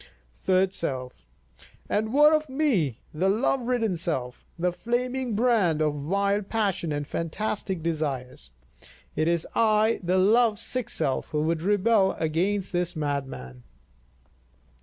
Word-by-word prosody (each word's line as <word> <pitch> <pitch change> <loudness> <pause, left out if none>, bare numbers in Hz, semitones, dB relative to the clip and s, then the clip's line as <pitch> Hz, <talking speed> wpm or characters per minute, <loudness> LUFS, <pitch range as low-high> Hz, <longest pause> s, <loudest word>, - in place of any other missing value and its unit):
Third 185 - +1
Self: 130 - -4 0.6
And 220 +1 0
what 295 +3 +6
of 305 -1 +1
me, 235 - 0
the 180 +5 +1
love 245 +6 +1
ridden 235 -5 0
self, 145 -8 -4
the 180 +1 +1
flaming 245 +4 -2
brand 215 -9 +2
of 150 -1 -1
wild 200 +1 +1
passion 200 -7 -1
and 145 0 -2
fantastic 185 +2 -3
desires? 140 - -3 0.6
It 155 - +1
is 170 -2 +1
I 220 0 +3
the 180 +1 +1
love 215 +3 +4
sick 255 +1 -3
self 140 -5 -1
who 150 -2 -1
would 160 0 0
rebel 205 +1 +3
against 180 +5 -1
this 175 0 0
madman. 135 - -4
185 Hz, 130 wpm, -26 LUFS, 155-220 Hz, 0.6 s, what